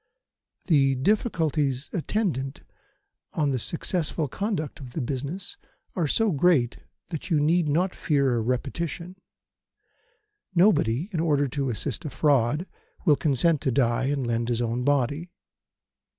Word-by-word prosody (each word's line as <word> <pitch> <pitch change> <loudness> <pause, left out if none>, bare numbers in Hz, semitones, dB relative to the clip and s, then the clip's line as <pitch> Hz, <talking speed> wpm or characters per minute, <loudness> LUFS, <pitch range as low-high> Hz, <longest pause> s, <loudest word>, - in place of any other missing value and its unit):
The 135 -6 +4
difficulties 150 - 0
attendant 160 - -2 0.7
on 150 -3 +1
the 130 - 0
successful 165 - -2
conduct 190 - -3
of 130 -4 -10
the - - -3
business 140 +9 -4 0.4
are 170 -4 +1
so 220 +8 +2
great 145 -6 +3 0.3
that 165 +1 -5
you 160 -4 +3
need 160 +2 +2
not 180 +5 +1
fear 140 -4 +1
a 115 - +1
repetition. 160 +9 -3 1.4
Nobody, 160 - +3
in 170 - -2
order 145 -3 +2
to 140 -1 -2
assist 115 - -2
a 150 - -4
fraud, 145 +2 +2 0.4
will 150 -5 +6
consent 150 +2 +2
to 135 - 0
die 125 -1 +2
and 140 -1 0
lend 115 0 -1
his 120 -1 0
own 120 +1 -1
body. 145 +4 +1
145 Hz, 135 wpm, -26 LUFS, 130-170 Hz, 1.4 s, will